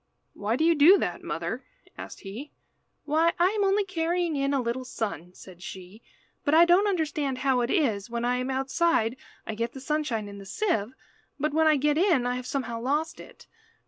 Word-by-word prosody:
"Why 210 Hz, +3 st, -1 dB
do 310 Hz, -, 0 dB
you 335 Hz, -, +5 dB
do 325 Hz, +6 st, +7 dB
that, -, -, -3 dB
mother?" -, -, -4 dB, 0.3 s
asked -, -, -9 dB
he. 220 Hz, +10 st, -8 dB, 0.5 s
"Why, 320 Hz, +3 st, +2 dB
I 350 Hz, +2 st, +4 dB
am 420 Hz, 0 st, 0 dB
only 395 Hz, +1 st, +2 dB
carrying 345 Hz, -2 st, -1 dB
in 275 Hz, 0 st, 0 dB
a 280 Hz, -, +1 dB
little 245 Hz, +1 st, -2 dB
sun," 205 Hz, -, -5 dB
said 180 Hz, -2 st, -13 dB
she, 190 Hz, +4 st, -10 dB, 0.4 s
"but 290 Hz, -, +2 dB
I 335 Hz, +1 st, +8 dB
don't 360 Hz, +4 st, +4 dB
understand 305 Hz, -7 st, -1 dB
how 260 Hz, -2 st, +3 dB
it 240 Hz, -, -1 dB
is, 235 Hz, -, 0 dB
when 235 Hz, 0 st, -2 dB
I 250 Hz, +1 st, +1 dB
am 255 Hz, +1 st, -3 dB
outside 265 Hz, -2 st, +1 dB, 0.3 s
I 220 Hz, -, -4 dB
get 230 Hz, +2 st, -3 dB
the 265 Hz, -, -8 dB
sunshine 265 Hz, -6 st, -2 dB
in 200 Hz, 0 st, -9 dB
the 195 Hz, -, -10 dB
sieve, 245 Hz, -, -1 dB, 0.4 s
but 300 Hz, +1 st, -1 dB
when 320 Hz, +1 st, +3 dB
I 310 Hz, -, +5 dB
get 295 Hz, +2 st, +1 dB
in 340 Hz, -10 st, +3 dB
I 245 Hz, -, 0 dB
have 250 Hz, 0 st, -5 dB
somehow 235 Hz, -4 st, -3 dB
lost 295 Hz, +6 st, -1 dB
it. -, -, -13 dB
275 Hz, 205 wpm, -27 LUFS, 235-325 Hz, 0.5 s, I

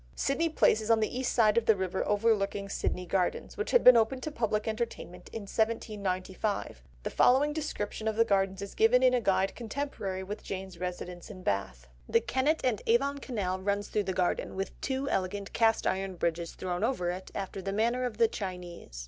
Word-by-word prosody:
Sydney 325 Hz, +5 st, +1 dB
Place 265 Hz, -7 st, +3 dB
is 215 Hz, -, -5 dB
on 225 Hz, -1 st, +5 dB
the 215 Hz, +2 st, -1 dB
east 255 Hz, 0 st, -1 dB
side 220 Hz, -1 st, +4 dB
of 230 Hz, -, -11 dB
the 220 Hz, -, +6 dB
River 190 Hz, -1 st, -1 dB
overlooking 205 Hz, -2 st, +1 dB
Sydney 180 Hz, -2 st, -2 dB
Gardens, 180 Hz, 0 st, -1 dB
which 425 Hz, -, -3 dB
had -, -, +4 dB
been 250 Hz, -, +10 dB
opened 235 Hz, +3 st, +2 dB
for 310 Hz, -, -3 dB
public 215 Hz, -5 st, -1 dB
entertainment 220 Hz, -5 st, -4 dB
in 225 Hz, -, -5 dB
1795; 200 Hz, -, -2 dB, 0.2 s
the -, -, -3 dB
following 280 Hz, +4 st, +4 dB
description 220 Hz, -8 st, -3 dB
of 220 Hz, -, 0 dB
the 230 Hz, +1 st, +4 dB
Gardens 195 Hz, -2 st, +1 dB
is 200 Hz, -, -7 dB
given 245 Hz, +3 st, +4 dB
in 255 Hz, -1 st, +5 dB
a 250 Hz, -, +2 dB
guide 195 Hz, -1 st, +2 dB
contemporary 225 Hz, -6 st, -4 dB
with 205 Hz, +3 st, -6 dB
Jane's 190 Hz, -2 st, -6 dB
residence 180 Hz, 0 st, -5 dB
in 185 Hz, -3 st, -10 dB
Bath. 65 Hz, -, -2 dB, 0.2 s
"The -, -, +5 dB
Kennet 280 Hz, +5 st, 0 dB
and 245 Hz, -6 st, +1 dB
Avon 280 Hz, +5 st, +2 dB
Canal 200 Hz, -9 st, -2 dB
runs 200 Hz, +1 st, -1 dB
through 210 Hz, -2 st, 0 dB
the 190 Hz, -, -1 dB
garden, 180 Hz, 0 st, -1 dB
with 195 Hz, +1 st, -3 dB
two 270 Hz, 0 st, -2 dB
elegant 195 Hz, -2 st, -2 dB
cast 225 Hz, -1 st, +3 dB
iron 190 Hz, 0 st, -1 dB
bridges 170 Hz, 0 st, -2 dB
thrown 180 Hz, -1 st, -3 dB
over 180 Hz, -10 st, 0 dB
it, 185 Hz, +1 st, -7 dB
after 195 Hz, 0 st, -4 dB
the 195 Hz, +1 st, -3 dB
manner 235 Hz, +5 st, +1 dB
of 245 Hz, -4 st, -3 dB
the 230 Hz, 0 st, +5 dB
Chinese. 180 Hz, -, -7 dB
205 Hz, 200 wpm, -30 LUFS, 185-235 Hz, 0.2 s, been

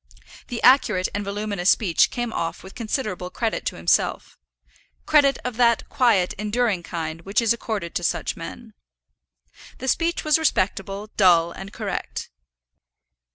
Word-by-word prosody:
The 240 Hz, -, -5 dB
accurate 250 Hz, -8 st, +4 dB
and 205 Hz, -, -2 dB
voluminous 200 Hz, -2 st, -1 dB
speech 180 Hz, -7 st, +3 dB
came 240 Hz, -2 st, -4 dB
off 165 Hz, -1 st, -3 dB
with 190 Hz, -, -11 dB
considerable 215 Hz, -6 st, -3 dB
credit 225 Hz, +3 st, -2 dB
to -, -, -2 dB
himself, 85 Hz, 0 st, 0 dB, 0.7 s
credit 285 Hz, -3 st, +4 dB
of 250 Hz, -2 st, -4 dB
that 235 Hz, -2 st, +3 dB
quiet, 220 Hz, -8 st, +2 dB
enduring 210 Hz, -2 st, 0 dB
kind 165 Hz, -2 st, -5 dB
which 195 Hz, +4 st, 0 dB
is 230 Hz, -1 st, +3 dB
accorded 215 Hz, -7 st, -4 dB
to -, -, -2 dB
such -, -, -1 dB
men. -, -, -9 dB, 1.0 s
The 260 Hz, -, -6 dB
speech 335 Hz, +5 st, 0 dB
was 305 Hz, 0 st, +3 dB
respectable, 200 Hz, -6 st, -1 dB
dull, 170 Hz, -4 st, +5 dB
and 195 Hz, +3 st, -9 dB
correct. -, -, -5 dB
210 Hz, 140 wpm, -23 LUFS, 185-240 Hz, 1.0 s, dull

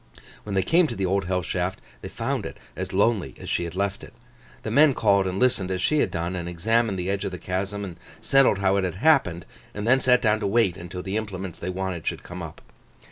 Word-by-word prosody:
When 100 Hz, -2 st, -5 dB
they 95 Hz, -, +2 dB
came 165 Hz, -, +4 dB
to 120 Hz, -, -5 dB
the 95 Hz, -, -1 dB
Old 95 Hz, +1 st, 0 dB
Hell 90 Hz, 0 st, -1 dB
Shaft, 90 Hz, +3 st, -2 dB, 0.2 s
they -, -, -6 dB
found -, -, -2 dB
it -, -, -7 dB, 0.2 s
as -, -, -4 dB
lonely 100 Hz, 0 st, +1 dB
as -, -, -7 dB
she 85 Hz, -, 0 dB
had 85 Hz, 0 st, -7 dB
left 100 Hz, +1 st, -2 dB
it. -, -, -12 dB, 0.5 s
The 110 Hz, -, -3 dB
men 145 Hz, +2 st, +5 dB
called 100 Hz, -3 st, +3 dB
and 95 Hz, 0 st, -2 dB
listened 105 Hz, -6 st, +2 dB
as 95 Hz, -1 st, -1 dB
she 150 Hz, +11 st, +2 dB
had -, -, +2 dB
done, 85 Hz, +2 st, -3 dB
and 85 Hz, -1 st, -4 dB
examined 110 Hz, +4 st, +1 dB
the 90 Hz, 0 st, -3 dB
edge 100 Hz, +1 st, -1 dB
of 100 Hz, -, -1 dB
the 90 Hz, -, -6 dB
chasm, 95 Hz, +4 st, -3 dB
and 90 Hz, -3 st, -8 dB, 0.2 s
settled 135 Hz, -6 st, +4 dB
how 100 Hz, 0 st, +2 dB
it 100 Hz, -, +1 dB
had 90 Hz, -2 st, -2 dB
happened, 100 Hz, -, +3 dB, 0.3 s
and 105 Hz, 0 st, -4 dB
then 130 Hz, +2 st, +5 dB
sat 125 Hz, -1 st, +5 dB
down 110 Hz, -1 st, +3 dB
to 105 Hz, -, -1 dB
wait 100 Hz, -3 st, +2 dB
until 90 Hz, +1 st, -7 dB
the 95 Hz, +2 st, -2 dB
implements 95 Hz, -5 st, -5 dB
they -, -, -4 dB
wanted 95 Hz, -2 st, -4 dB
should -, -, -2 dB
come 90 Hz, +1 st, -8 dB
up. 80 Hz, -2 st, -8 dB
95 Hz, 245 wpm, -25 LUFS, 90-110 Hz, 0.5 s, men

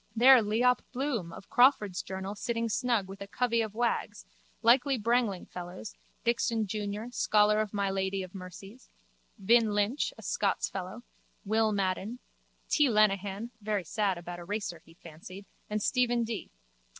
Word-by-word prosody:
There 250 Hz, +2 st, +8 dB
Leop. 235 Hz, +4 st, +2 dB
Bloom 245 Hz, -10 st, -2 dB
of 190 Hz, -, -11 dB
Crawford's 245 Hz, -8 st, +4 dB
journal 190 Hz, +1 st, -5 dB
sitting 230 Hz, +2 st, -2 dB
snug 225 Hz, -3 st, 0 dB
with 195 Hz, +1 st, -10 dB
a 200 Hz, -, -6 dB
covey 230 Hz, +4 st, 0 dB
of 215 Hz, -2 st, -4 dB
wags, 235 Hz, -, -1 dB, 0.4 s
likely 260 Hz, +3 st, +4 dB
brangling 230 Hz, -4 st, 0 dB
fellows, 180 Hz, +3 st, -8 dB, 0.3 s
Dixon 230 Hz, -1 st, +1 dB
jun., 210 Hz, +3 st, -4 dB
scholar 210 Hz, -2 st, +3 dB
of 215 Hz, -2 st, -3 dB
my 200 Hz, -2 st, -1 dB
lady 190 Hz, 0 st, -1 dB
of 185 Hz, -, -10 dB
Mercy's, 195 Hz, +5 st, -11 dB, 0.5 s
Vin. 220 Hz, +1 st, +3 dB
Lynch, 210 Hz, +7 st, 0 dB
a -, -, -12 dB
Scots -, -, 0 dB
fellow, 190 Hz, +5 st, -6 dB, 0.4 s
Will. 220 Hz, +1 st, +2 dB
Madden, 195 Hz, +3 st, -1 dB, 0.5 s
T. 295 Hz, -3 st, +3 dB
Lenehan, 210 Hz, 0 st, +1 dB
very 205 Hz, -2 st, -1 dB
sad 195 Hz, +2 st, -1 dB
about 175 Hz, 0 st, -7 dB
a -, -, -8 dB
racer 195 Hz, -3 st, -4 dB
he 165 Hz, -, -19 dB
fancied 175 Hz, +4 st, -11 dB, 0.2 s
and 210 Hz, -1 st, -2 dB
Stephen 240 Hz, -2 st, +2 dB
D. 225 Hz, -2 st, -5 dB
210 Hz, 150 wpm, -30 LUFS, 195-235 Hz, 0.5 s, There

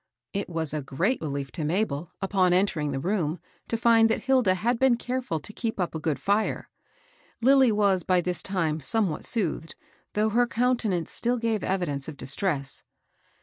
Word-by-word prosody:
It 200 Hz, -1 st, -3 dB
was 160 Hz, -3 st, +1 dB
a 155 Hz, -, -2 dB
great 170 Hz, -, -1 dB
relief 140 Hz, -3 st, -4 dB
to 160 Hz, -, -4 dB
Mabel, 160 Hz, -1 st, -1 dB
upon 190 Hz, -2 st, +2 dB
entering 180 Hz, -5 st, +1 dB
the 135 Hz, -1 st, -2 dB
room, 175 Hz, -1 st, -1 dB, 0.3 s
to 230 Hz, -, -1 dB
find 225 Hz, -1 st, +5 dB
that 225 Hz, -, -1 dB
Hilda 255 Hz, -8 st, +3 dB
had 230 Hz, +5 st, 0 dB
been 265 Hz, -3 st, +4 dB
careAil 245 Hz, -9 st, -3 dB
to 210 Hz, -, -8 dB
keep 225 Hz, -3 st, -4 dB
up 180 Hz, -, -1 dB
a 160 Hz, -, -3 dB
good 155 Hz, -3 st, -1 dB
fire. 205 Hz, +7 st, -1 dB, 0.7 s
Lilly 265 Hz, 0 st, +5 dB
was 200 Hz, -3 st, +3 dB
by 185 Hz, 0 st, +2 dB
this 180 Hz, 0 st, 0 dB
time 165 Hz, -6 st, -1 dB
somewhat 185 Hz, +2 st, 0 dB
soothed, 170 Hz, -7 st, -2 dB, 0.4 s
though 215 Hz, +1 st, +2 dB
her 240 Hz, +3 st, +2 dB
countenance 230 Hz, -8 st, 0 dB
still 245 Hz, +1 st, 0 dB
gave 225 Hz, -2 st, -1 dB
evidence 170 Hz, -8 st, -2 dB
of 155 Hz, -3 st, -7 dB
dis 135 Hz, +2 st, -3 dB
tress. 145 Hz, -8 st, -1 dB
190 Hz, 180 wpm, -26 LUFS, 160-225 Hz, 0.7 s, find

